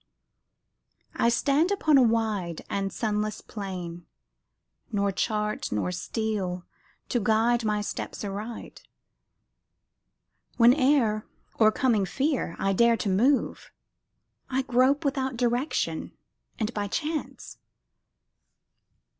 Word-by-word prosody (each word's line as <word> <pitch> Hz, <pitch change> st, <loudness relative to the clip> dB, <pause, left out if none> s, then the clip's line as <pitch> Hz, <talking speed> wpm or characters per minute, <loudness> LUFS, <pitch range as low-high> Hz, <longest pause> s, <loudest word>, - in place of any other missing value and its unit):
I 235 Hz, -, +3 dB
stand 280 Hz, +8 st, +2 dB
upon 355 Hz, -7 st, +3 dB
a -, -, +6 dB
wide 220 Hz, -8 st, 0 dB
and 195 Hz, -1 st, -1 dB
sunless 215 Hz, -1 st, -2 dB
plain, 180 Hz, -4 st, -7 dB, 0.8 s
Nor 200 Hz, -2 st, +1 dB
chart 210 Hz, +1 st, -2 dB
nor 105 Hz, -, -1 dB
steel 185 Hz, -2 st, -3 dB, 0.4 s
to 245 Hz, -, +1 dB
guide 225 Hz, +2 st, +2 dB
my 210 Hz, -1 st, 0 dB
steps 205 Hz, -, -5 dB
aright. 210 Hz, +4 st, -6 dB, 1.8 s
Whene'er, 245 Hz, -3 st, +4 dB, 0.3 s
o'ercoming 215 Hz, -2 st, +3 dB
fear, 270 Hz, -, -1 dB
I 195 Hz, 0 st, 0 dB
dare 235 Hz, +3 st, +4 dB
to 205 Hz, -, -2 dB
move, 250 Hz, +9 st, +1 dB, 0.8 s
I 265 Hz, 0 st, 0 dB
grope 260 Hz, +4 st, +2 dB
without 265 Hz, -2 st, -1 dB
direction 245 Hz, +4 st, -1 dB, 0.4 s
and 220 Hz, 0 st, -2 dB
by 205 Hz, -2 st, -2 dB
chance. 310 Hz, -, -4 dB
220 Hz, 95 wpm, -27 LUFS, 200-255 Hz, 1.8 s, a